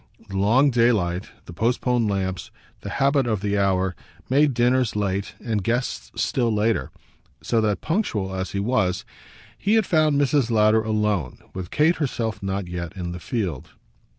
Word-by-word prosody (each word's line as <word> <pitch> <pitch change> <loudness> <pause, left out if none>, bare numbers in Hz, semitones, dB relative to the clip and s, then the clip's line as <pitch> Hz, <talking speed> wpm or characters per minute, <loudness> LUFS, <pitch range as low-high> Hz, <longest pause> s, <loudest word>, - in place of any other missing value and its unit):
The 95 - -6
long 120 +9 +4
daylight, 105 -7 +1 0.2
the 85 - -10
postponed 120 +2 +1
lamps, 95 -2 -2 0.3
the - - -7
habit 140 -1 +2
of 110 -4 0
the 100 0 0
hour, 95 -2 +1 0.4
made 140 -1 +4
dinners 125 -1 +2
late 100 -1 -2
and 110 -4 -2
guests 115 - -2
still 120 -3 +1
later; 105 - +1 0.5
so 115 -2 +1
that, 105 -4 0
punctual 110 - -1
as 95 0 -3
he 100 - -1
was, 100 -4 0 0.5
he 210 +3 +2
had 220 -2 +3
found 155 -4 +3
Mrs. 140 -3 +2
Lowder 110 -1 +4
alone, 105 - -1 0.2
with 95 -1 -6
Kate 160 +3 +3
herself 115 -7 -2
not 95 -1 -3
yet 85 0 -6
in 90 -2 -4
the 90 - -6
field. 90 - -4
110 Hz, 160 wpm, -23 LUFS, 95-125 Hz, 0.5 s, long